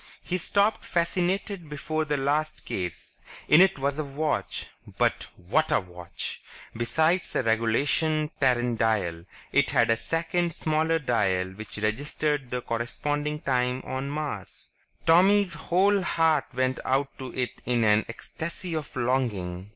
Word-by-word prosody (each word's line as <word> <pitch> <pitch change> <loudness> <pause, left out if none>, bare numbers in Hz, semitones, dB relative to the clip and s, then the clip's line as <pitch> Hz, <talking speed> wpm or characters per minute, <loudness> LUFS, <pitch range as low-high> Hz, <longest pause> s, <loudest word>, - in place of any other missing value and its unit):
He 180 0 -2
stopped 200 +5 +2
fascinated 180 +1 -1
before 155 +1 -2
the 145 -1 0
last 145 +3 -1
case. 90 -4 -5 0.3
In 150 +3 +7
it 190 -2 +5
was 140 +2 -1
a - - 0
watch... 145 +2 -2 0.3
but, - - +1
what 115 - 0
a - - +4
watch! 90 -2 -7 0.3
Besides 160 +10 +1
the - - +1
regulation 140 +7 +1
Terran 125 -3 +2
dial, 95 -7 0 0.3
it - - +3
had - - +3
a 115 - +3
second 170 +4 -1
smaller 160 +1 +1
dial 95 - 0
that 105 +1 -9
registered 135 +5 -1
the 125 0 -3
corresponding 145 +6 -2
time 125 -1 0
on 130 +1 -3
Mars. 145 -9 -5 0.3
Tommy's 185 +3 +5
whole 190 +5 +2
heart 160 -4 +2
went 130 0 0
out 135 +1 0
to 130 -1 -6
it 125 -1 -3
in 120 -2 +2
an 105 0 +4
ecstasy 170 +8 -5
of 155 -3 -5
longing. 105 -8 -1
140 Hz, 140 wpm, -27 LUFS, 115-160 Hz, 0.3 s, In